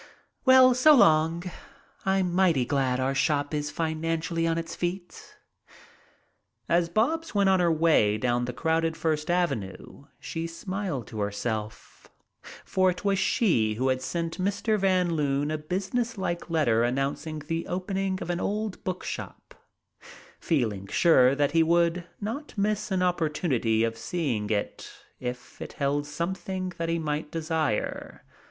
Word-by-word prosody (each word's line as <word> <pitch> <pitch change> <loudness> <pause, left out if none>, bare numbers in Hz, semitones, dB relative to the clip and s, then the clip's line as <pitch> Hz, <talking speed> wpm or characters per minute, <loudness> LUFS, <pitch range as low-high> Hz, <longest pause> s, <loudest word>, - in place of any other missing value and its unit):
Well, 260 -1 +7
so 295 +5 +6
long! 165 - +4 0.6
I'm 190 -2 +1
mighty 175 -8 +3
glad 130 -2 0
our 130 +1 0
shop 145 +1 0
is 150 0 -1
financially 165 +1 -1
on 165 0 0
its 165 0 -4
feet." 175 +1 -5 1.3
As 170 0 +2
Bobs 290 - 0
went 200 -1 +4
on 190 -1 +4
her 175 -1 +3
way 155 -10 +3
down 120 +1 0
the 125 - -3
crowded 160 +4 0
First 160 -1 -1
Avenue 140 - -2
she 165 +1 -4
smiled 170 - -4
to 110 0 -8
herself, 105 +1 -4 0.6
for 185 0 +2
it 180 +2 -4
was 195 -1 +2
she 120 - +2
who 130 +4 0
had 130 0 0
sent 165 +6 -3
Mr. 200 +3 0
Van 185 -3 +2
Loon 145 -1 0
a 155 - -1
business 195 +9 -2
like 175 -2 -3
letter 120 -9 +2
announcing 135 +5 -2
the 165 +2 -4
opening 190 +1 -2
of 175 - -3
an 175 - -2
old 210 0 -3
book 185 -1 -4
shop, - - -7 0.9
feeling 110 - -1
sure 130 - +4
that 145 0 +1
he 165 +1 +4
would 170 +1 +2
not 230 +6 -5
miss 210 +1 0
an 185 -2 0
opportunity 150 -10 +1
of 115 0 -1
seeing 115 -3 -2
it 105 -2 -3 0.3
if 125 0 -7
it - - -7
held 145 +1 -1
something 185 +3 -4
that 165 0 -1
he 165 - +1
might 150 -1 -3
desire. 160 -6 -2
165 Hz, 145 wpm, -27 LUFS, 135-185 Hz, 1.3 s, Well